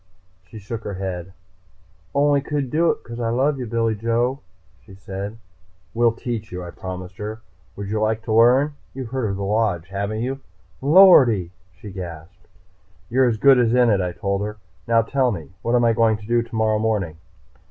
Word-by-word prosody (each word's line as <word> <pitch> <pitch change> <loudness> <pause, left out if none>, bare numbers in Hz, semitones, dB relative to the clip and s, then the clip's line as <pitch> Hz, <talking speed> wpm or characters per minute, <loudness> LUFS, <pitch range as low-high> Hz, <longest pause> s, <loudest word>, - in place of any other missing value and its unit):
She 110 - -11
shook 110 +2 -7
her 100 - -5
head. 95 -1 -5 0.8
"Only 145 0 +3
could 140 -2 -3
do 165 +2 +3
it - - -1
because 115 0 -8
I 115 -1 -1
love 135 +4 +1
you, 125 - -4
Billy 115 0 0
Joe," 115 +4 0 0.4
she 100 -3 -14
said. 100 +2 -7 0.6
"We'll 115 0 +3
teach 115 -1 -5
you," 90 0 -5
I 85 - -8
promised 90 0 -8
her. 110 +2 -6 0.3
"Would 100 0 -6
you 110 +1 -2
like 110 +1 0
to 110 - -2
learn? 125 +6 +5 0.2
You've 130 -3 -6
heard 130 -4 -1
of 100 - -2
the 100 - -4
Lodge, 100 -4 0
haven't 100 +3 -3
you?" 135 +3 -3 0.4
"Lordy!" 135 - +6 0.2
she 95 +4 -11
gasped. 90 0 -9 0.6
"You're 130 +1 +4
as 110 - -1
good 135 +2 +6
as 120 0 +2
in 125 -2 +4
it," 100 -2 +2
I 90 -1 -2
told 100 +3 -2
her. 105 +1 -4 0.3
"Now 115 0 +4
tell 130 +2 +1
me, 85 -6 -7
what 120 +1 0
am 120 -1 +3
I 115 - +4
going 110 -1 +3
to 105 - -13
do 120 +2 +2
tomorrow 110 -2 0
morning?" 105 -7 -1
110 Hz, 195 wpm, -22 LUFS, 100-120 Hz, 0.8 s, Lordy